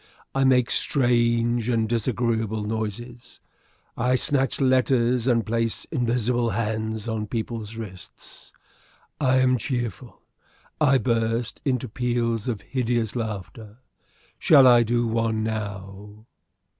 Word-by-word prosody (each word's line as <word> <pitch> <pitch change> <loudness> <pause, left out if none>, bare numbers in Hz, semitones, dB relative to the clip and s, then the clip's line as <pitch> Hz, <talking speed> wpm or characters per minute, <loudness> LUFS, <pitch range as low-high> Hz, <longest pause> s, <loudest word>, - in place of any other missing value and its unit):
I 135 0 +2
make 125 -2 +3
strange 120 -2 +2
and 115 -2 +1
disagreeable 115 -2 -1
noises. 110 +3 -6 0.6
I 125 +2 +1
snatch 135 +1 +1
letters 125 -2 +2
and 115 -3 +2
place 115 0 -1
invisible 120 -3 0
hands 110 0 -3
on 110 -2 -3
people's 115 -1 -5
wrists. 95 -6 -11 0.7
I 130 -2 +3
am 130 -1 +3
cheerful. 120 0 -5 0.6
I 135 -2 +5
burst 115 -1 -1
into 130 -2 0
peals 120 -1 -2
of 115 -5 -3
hideous 120 -4 -2
laughter. 110 -1 -6 0.6
Shall 140 -4 +6
I 120 -2 +7
do 120 +1 +1
one 115 -1 0
now?" 105 -1 -6
115 Hz, 110 wpm, -24 LUFS, 110-125 Hz, 0.7 s, I